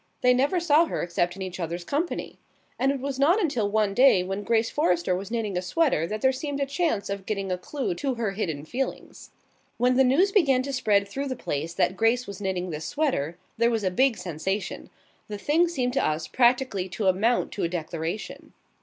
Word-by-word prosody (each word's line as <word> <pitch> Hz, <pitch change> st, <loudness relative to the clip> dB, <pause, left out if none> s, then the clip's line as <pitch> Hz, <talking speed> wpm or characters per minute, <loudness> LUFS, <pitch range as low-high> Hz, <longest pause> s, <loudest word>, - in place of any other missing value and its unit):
They 250 Hz, 0 st, +5 dB
never 280 Hz, +8 st, +2 dB
saw 330 Hz, -1 st, +4 dB
her -, -, -3 dB
except 175 Hz, +1 st, -1 dB
in 195 Hz, -, -6 dB
each 185 Hz, 0 st, -6 dB
other's 170 Hz, +1 st, -3 dB
company. 300 Hz, -, -3 dB, 0.4 s
And 270 Hz, -, +3 dB
it 280 Hz, -, -3 dB
was 270 Hz, 0 st, -4 dB
not 335 Hz, +9 st, +4 dB
until 250 Hz, -, 0 dB
one 210 Hz, -1 st, +1 dB
day 245 Hz, -6 st, +5 dB
when 195 Hz, +2 st, -3 dB
Grace 225 Hz, +2 st, +1 dB
Forrester 180 Hz, -, +1 dB
was 190 Hz, +2 st, -5 dB
knitting 225 Hz, -4 st, -2 dB
a 180 Hz, -, 0 dB
sweater 185 Hz, -, +1 dB
that 215 Hz, +3 st, -4 dB
there 265 Hz, -, +4 dB
seemed 280 Hz, +2 st, -4 dB
a 280 Hz, -, +1 dB
chance 280 Hz, -, -1 dB
of 200 Hz, -1 st, -5 dB
getting 195 Hz, -3 st, -2 dB
a 180 Hz, -, 0 dB
clue 265 Hz, +2 st, -3 dB
to 265 Hz, +8 st, -2 dB
her 230 Hz, -4 st, -1 dB
hidden 160 Hz, -8 st, -3 dB
feelings. 260 Hz, +10 st, -5 dB, 0.5 s
When 250 Hz, +1 st, +2 dB
the 265 Hz, -, +6 dB
news 305 Hz, +11 st, +3 dB
began 275 Hz, -11 st, +3 dB
to 275 Hz, +1 st, -4 dB
spread 205 Hz, -6 st, +2 dB
through 275 Hz, +7 st, -4 dB
the 260 Hz, -, -3 dB
place 160 Hz, -, -4 dB
that 185 Hz, -, +1 dB
Grace 230 Hz, +3 st, +2 dB
was 200 Hz, 0 st, -8 dB
knitting 185 Hz, -2 st, -2 dB
this 155 Hz, 0 st, -5 dB
sweater 215 Hz, -, -1 dB, 0.2 s
there 235 Hz, 0 st, +4 dB
was 225 Hz, -3 st, -1 dB
a 185 Hz, -, +1 dB
big 260 Hz, +5 st, +2 dB
sensation. 180 Hz, +2 st, -4 dB, 0.4 s
The 210 Hz, -, -5 dB
thing 315 Hz, +10 st, +2 dB
seemed 255 Hz, -7 st, -1 dB
to -, -, +1 dB
us 155 Hz, +1 st, -1 dB
practically 240 Hz, -6 st, +2 dB
to 190 Hz, +4 st, -3 dB
amount 200 Hz, +6 st, +2 dB
to 200 Hz, -, -4 dB
a 170 Hz, -, +1 dB
declaration. 165 Hz, +3 st, -5 dB
220 Hz, 215 wpm, -26 LUFS, 185-270 Hz, 0.5 s, the